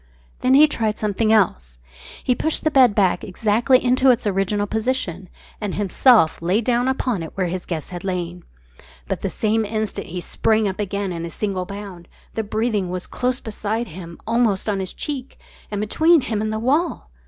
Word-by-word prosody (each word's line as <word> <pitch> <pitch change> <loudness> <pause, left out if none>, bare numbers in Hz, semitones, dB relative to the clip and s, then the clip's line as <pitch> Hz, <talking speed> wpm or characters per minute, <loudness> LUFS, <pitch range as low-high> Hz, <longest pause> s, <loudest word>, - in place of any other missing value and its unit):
Then 255 +1 +3
he 300 +2 +8
tried 220 -7 -1
something 215 +1 0
else. 65 - +1 0.5
He 250 - +2
pushed 315 +5 -1
the 310 - +2
bed 255 -7 +5
back 190 -4 +2
exactly 220 +6 +2
into 255 +2 +4
its 245 -1 +3
original 205 +1 0
position 215 -5 -2 0.3
and 205 -3 -3
himself 205 -3 +4
lay 180 +5 +2
down 245 +1 +1
upon 250 -6 0
it 165 - -4
just - - -17
where 185 - +1
his 180 +1 -4
guest 165 0 -4
had 175 -1 -6
lain. 180 -2 -3 0.6
But - - -3
the - - -1
same 220 +1 0
instant 215 0 -3
he 180 +2 -5
sprang 220 +4 +1
up 190 +1 -4
again 200 -1 -2
in 170 -1 -4
a 170 - -4
single 190 +1 -3
bound. 200 -4 -8 0.3
The 225 - -1
breathing 215 -3 -1
was 180 0 -4
close 250 +1 -1
beside 220 +1 -3
him, 170 0 -9
almost 225 -4 +1
on 205 -2 0
his 185 -1 -4
cheek, 275 -3 -5 0.3
and 205 - -3
between 315 +10 +4
him 220 -4 -2
and 215 0 -1
the 220 - -2
wall! 270 - 0
210 Hz, 190 wpm, -21 LUFS, 185-240 Hz, 0.6 s, he